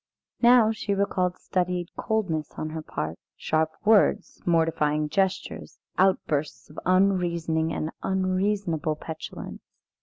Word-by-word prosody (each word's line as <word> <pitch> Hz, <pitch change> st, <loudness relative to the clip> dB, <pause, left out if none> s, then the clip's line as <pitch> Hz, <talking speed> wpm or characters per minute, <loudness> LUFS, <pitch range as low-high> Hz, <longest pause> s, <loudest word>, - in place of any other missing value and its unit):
Now 240 Hz, -2 st, +6 dB
she 210 Hz, -2 st, -2 dB
recalled 185 Hz, -2 st, 0 dB
studied 180 Hz, -1 st, -2 dB
coldness 185 Hz, -9 st, -1 dB
on 155 Hz, -, -3 dB
her 160 Hz, 0 st, -4 dB
part, 80 Hz, -, -5 dB, 0.2 s
sharp 155 Hz, 0 st, +1 dB, 0.2 s
words, 215 Hz, -1 st, +3 dB
mortifying 155 Hz, -3 st, +2 dB
gestures, 190 Hz, +4 st, -2 dB, 0.2 s
outbursts 155 Hz, -7 st, 0 dB
of 150 Hz, -, -8 dB
unreasoning 170 Hz, -4 st, +2 dB
and 155 Hz, 0 st, -3 dB
unreasonable 185 Hz, -4 st, 0 dB
petulance. 160 Hz, +1 st, -8 dB
175 Hz, 110 wpm, -26 LUFS, 155-195 Hz, 0.2 s, Now